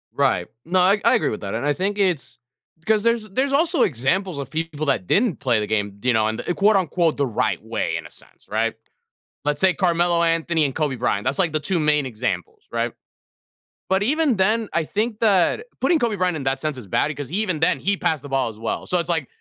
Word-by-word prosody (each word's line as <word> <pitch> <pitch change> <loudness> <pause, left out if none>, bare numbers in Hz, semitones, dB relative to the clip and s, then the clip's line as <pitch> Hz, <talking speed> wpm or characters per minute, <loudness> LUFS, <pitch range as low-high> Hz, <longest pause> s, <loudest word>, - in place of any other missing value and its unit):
Right. - - +1 0.2
No, 180 +3 +1
I 195 +3 +4
I - - +5
agree 155 - +1
with 105 - -5
that, 100 +1 -4
and 120 - -2
I 145 - +2
think 200 +4 -1
it's 180 -10 0 0.5
'cause 215 -1 +2
there's 230 -2 +1
there's 265 +7 0
also 320 0 +2
examples 165 - +1
of 140 -2 -5
people 155 -1 -3
that 110 -10 0
didn't 215 -5 +2
play 120 -6 +1
the 105 - -2
game, 100 -2 -2
you 125 0 +3
know, 110 -1 +2
in 110 0 -2
the - - -2
quote, 205 +3 +3
unquote 170 -4 +1
"the 140 - +1
right 115 - -1
way" - - -2
in - - -7
a - - -12
sense, - - -15
right? 115 +2 0 0.7
Let's 150 0 -1
say 190 -1 +4
Carmelo 175 -2 +2
Anthony 165 -1 +2
and 135 - -3
Kobe 150 -4 0
Bryant. 105 -4 0
That's, - - -1
like, 170 -5 +2
the 155 - +1
2 175 +3 -1
main 150 -2 +2
examples, 130 - -4
right? - - -1 1.0
But 190 +1 +2
even 280 +3 +2
then, 215 +3 +1
I 170 - +1
think 215 +6 -2
that 210 - +2
putting 335 -3 +2
Kobe 230 -3 0
Bryant 180 -3 0
in 140 - -4
that 135 0 0
sense 155 -1 -2
is 115 -6 -9
bad 145 - +1
because 145 -1 -6
even 185 -5 +1
then, 160 - +2
he 200 +1 0
passed 155 -3 -1
the 145 - -9
ball 135 -3 0
as 105 - -11
well. 115 0 -4
So, 180 - +1
it's 170 0 -2
like, 160 -6 0
165 Hz, 235 wpm, -22 LUFS, 135-200 Hz, 1.0 s, I